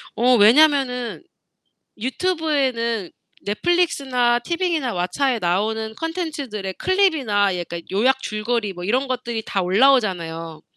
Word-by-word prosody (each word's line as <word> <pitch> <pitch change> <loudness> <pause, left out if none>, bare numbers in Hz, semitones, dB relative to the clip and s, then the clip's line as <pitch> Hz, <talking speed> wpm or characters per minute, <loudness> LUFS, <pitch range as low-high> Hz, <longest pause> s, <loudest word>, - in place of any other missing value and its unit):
어 250 +2 +4
왜냐면은 250 +2 +3 0.7
유튜브에는 260 - -1 0.4
넷플릭스나 255 - +1
티빙이나 335 -3 -1
왓챠에 225 +8 -1
나오는 220 +5 -1
컨텐츠들의 285 - -4
클립이나 270 - +1
약간 170 -1 -5
요약 255 +7 +2
줄거리 215 -2 -2
뭐 175 - -8
이런 255 +8 0
것들이 240 -3 -3
다 195 - -1
올라오잖아요. 180 - +1
240 Hz, 300 characters per minute, -21 LUFS, 205-280 Hz, 0.7 s, 어